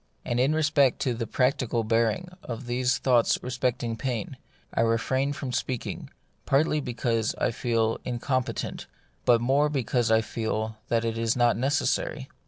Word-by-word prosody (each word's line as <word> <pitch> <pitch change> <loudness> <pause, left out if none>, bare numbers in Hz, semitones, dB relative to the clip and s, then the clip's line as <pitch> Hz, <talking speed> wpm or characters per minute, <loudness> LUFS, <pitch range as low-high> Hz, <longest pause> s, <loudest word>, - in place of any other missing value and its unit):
And 120 - -1
in 135 +5 +3
respect 150 -4 +3
to 125 - +1
the 115 -1 -4
practical 125 -2 +1
bearing 115 +10 +1
of 120 +1 -6
these 125 +1 +1
thoughts 125 -3 +3
respecting 120 -2 -1
pain, 125 0 -3 0.4
I - - +1
refrain 125 +5 +1
from 140 -3 -4
speaking, 125 0 -3 0.4
partly 150 +2 +3
because 115 -3 -1
I - - 0
feel 115 -2 0
incompetent, 125 +1 -2 0.4
but 120 -1 +5
more 140 +5 +3
because 125 -4 0
I 110 0 +5
feel 110 0 -3
that 115 -1 +1
it 115 0 -2
is 115 0 +1
not 120 -1 +3
neces 135 +5 +1
sary. 135 -3 -2
120 Hz, 155 wpm, -27 LUFS, 115-130 Hz, 0.4 s, but